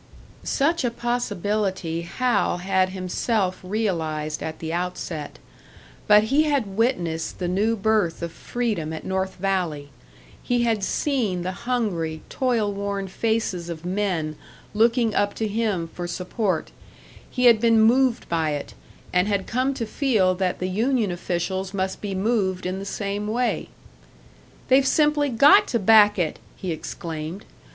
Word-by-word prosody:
Such 315 Hz, +3 st, +1 dB
a 245 Hz, -, +2 dB
possibility 205 Hz, -7 st, -2 dB
Hal 240 Hz, +4 st, 0 dB
had 185 Hz, +1 st, +1 dB
himself 185 Hz, +1 st, -1 dB
realised 165 Hz, -7 st, -2 dB
at 160 Hz, 0 st, -4 dB
the 160 Hz, 0 st, -5 dB
outset. 170 Hz, -3 st, -4 dB, 0.7 s
But 210 Hz, 0 st, +7 dB
he 305 Hz, +2 st, +5 dB
had 285 Hz, -6 st, +1 dB
witnessed 175 Hz, -9 st, 0 dB
the 180 Hz, -, -2 dB
new 205 Hz, +5 st, +1 dB
birth 205 Hz, -6 st, +1 dB
of 170 Hz, -, -3 dB
freedom 210 Hz, -8 st, -3 dB
at 160 Hz, -, -6 dB
North 190 Hz, 0 st, -2 dB
Valley, 175 Hz, -7 st, -2 dB, 0.5 s
he 245 Hz, -1 st, +1 dB
had 225 Hz, -4 st, +1 dB
seen 215 Hz, -, 0 dB
the 185 Hz, -, -2 dB
hungry, 180 Hz, -8 st, -2 dB
toil 230 Hz, -6 st, 0 dB
worn 200 Hz, -1 st, -3 dB
faces 195 Hz, -5 st, -1 dB
of 165 Hz, 0 st, -7 dB
men 180 Hz, -5 st, -1 dB, 0.4 s
looking 230 Hz, +1 st, +3 dB
up 205 Hz, 0 st, +1 dB
to 220 Hz, -, -1 dB
him 205 Hz, -5 st, -1 dB
for 175 Hz, +1 st, -6 dB
support; 180 Hz, 0 st, -2 dB, 0.6 s
he 250 Hz, -1 st, 0 dB
had 230 Hz, -3 st, +7 dB
been 230 Hz, -1 st, +4 dB
moved 245 Hz, +2 st, +3 dB
by 160 Hz, -3 st, 0 dB
it, 145 Hz, -1 st, -5 dB, 0.4 s
and 180 Hz, +2 st, +3 dB
had 200 Hz, -2 st, 0 dB
come 255 Hz, +3 st, 0 dB
to 235 Hz, -, -2 dB
feel 215 Hz, -6 st, +2 dB
that 185 Hz, 0 st, -1 dB
the 185 Hz, -, -2 dB
union 220 Hz, +2 st, +1 dB
officials 185 Hz, +2 st, -3 dB
must 190 Hz, 0 st, -2 dB
be 200 Hz, -2 st, -3 dB
moved 190 Hz, -3 st, 0 dB
in 185 Hz, +1 st, -2 dB
the 195 Hz, -, -6 dB
same 200 Hz, +1 st, -3 dB
way. 230 Hz, 0 st, -1 dB, 1.0 s
"They've 265 Hz, +2 st, +6 dB
simply 295 Hz, -1 st, +3 dB
got 295 Hz, -, +6 dB
to 240 Hz, -, 0 dB
back 210 Hz, 0 st, +6 dB
it!" 175 Hz, -4 st, -1 dB, 0.2 s
he 185 Hz, -, -4 dB
exclaimed. 165 Hz, +2 st, -6 dB
200 Hz, 145 wpm, -24 LUFS, 180-230 Hz, 1.0 s, But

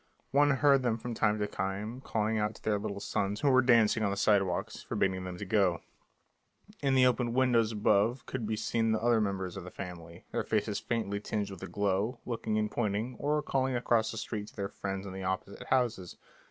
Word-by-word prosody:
One 145 Hz, +2 st, +5 dB
heard 140 Hz, 0 st, +4 dB
them 120 Hz, -3 st, 0 dB
from 120 Hz, +1 st, -5 dB
time 110 Hz, -1 st, +2 dB
to 105 Hz, -, 0 dB
time 105 Hz, +6 st, -4 dB
calling 110 Hz, 0 st, 0 dB
to 105 Hz, +1 st, -2 dB
their 105 Hz, -2 st, +1 dB
little 100 Hz, -1 st, -4 dB
sons, 100 Hz, +1 st, -2 dB
who 140 Hz, -, +4 dB
were 130 Hz, 0 st, +6 dB
dancing 115 Hz, -2 st, +4 dB
on 105 Hz, -, +2 dB
the 100 Hz, -, -2 dB
sidewalks, 100 Hz, -4 st, +1 dB
forbidding 95 Hz, -1 st, -1 dB
them 90 Hz, -1 st, -6 dB
to 100 Hz, -, -5 dB
go; 95 Hz, -4 st, +2 dB, 1.0 s
in 135 Hz, -2 st, +2 dB
the 130 Hz, -1 st, +6 dB
open 125 Hz, -1 st, +1 dB
windows 120 Hz, -4 st, +3 dB
above 105 Hz, +3 st, +2 dB
could 120 Hz, -4 st, -4 dB
be 110 Hz, -, 0 dB
seen 115 Hz, +1 st, 0 dB
the 110 Hz, -, +1 dB
other 115 Hz, 0 st, +3 dB
members 95 Hz, -3 st, -2 dB
of 95 Hz, -, -6 dB
the 90 Hz, -, -8 dB
family, 85 Hz, -3 st, -9 dB
their -, -, 0 dB
faces 105 Hz, -1 st, 0 dB
faintly 105 Hz, -4 st, -2 dB
tinged 105 Hz, -1 st, -3 dB
with 95 Hz, -, -8 dB
the -, -, -6 dB
glow, 100 Hz, +4 st, -1 dB
looking 115 Hz, -2 st, -2 dB
and 105 Hz, 0 st, 0 dB
pointing, 110 Hz, +2 st, -1 dB
or 150 Hz, +1 st, 0 dB
calling 130 Hz, -2 st, 0 dB
across 115 Hz, -2 st, +2 dB
the 115 Hz, -, -5 dB
street 105 Hz, -2 st, -4 dB
to -, -, -15 dB
their 100 Hz, -1 st, -3 dB
friends 95 Hz, 0 st, -5 dB
in 95 Hz, -, -6 dB
the 95 Hz, -, -6 dB
opposite 95 Hz, +1 st, -4 dB
houses. 120 Hz, -8 st, 0 dB
110 Hz, 210 wpm, -31 LUFS, 100-120 Hz, 1.0 s, were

